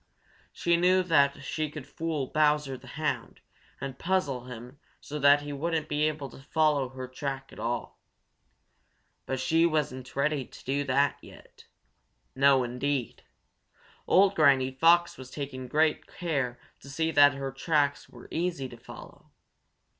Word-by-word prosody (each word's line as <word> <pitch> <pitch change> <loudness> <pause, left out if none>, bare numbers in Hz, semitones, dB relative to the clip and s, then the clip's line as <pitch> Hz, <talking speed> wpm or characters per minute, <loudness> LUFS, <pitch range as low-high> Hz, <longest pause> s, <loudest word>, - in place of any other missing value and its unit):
She 170 0 +1
knew 185 +2 +4
that 140 -5 +2
she 155 +1 -2
could 150 -2 -8
fool 160 -4 -3
Bowser 150 -1 +1
the 130 - -13
Hound 140 -6 -3 0.4
and 135 -1 -6
puzzle 155 -9 -1
him 125 +2 -10 0.2
so 150 +1 -6
that 145 +1 +5
he 145 0 -5
wouldn't 160 +1 -2
be 150 +1 +1
able 150 -2 -3
to - - -13
follow 150 -2 +1
her 130 0 -7
track 135 +1 -5
at - - -12
all. 120 0 -4 1.3
But 130 - -2
she 160 +5 +2
wasn't 135 -5 -2
ready 140 0 0
to - - -15
do 140 +2 0
that 140 +1 +1
yet. - - -16 0.7
No, 135 -1 +5
indeed! 125 +1 -2 0.9
Old 195 +1 +5
Granny 140 -6 +4
Fox 165 +4 +3
was 130 -1 -9
taking 130 -2 -6
great 155 +4 +1
care 140 -8 -3 0.2
to 140 - -13
see 160 +4 -1
that 145 -2 +6
her 135 -1 -4
tracks 145 -1 0
were - - -14
easy 170 -5 -2
to 120 - -11
follow. 115 - -13
140 Hz, 150 wpm, -28 LUFS, 130-155 Hz, 1.3 s, that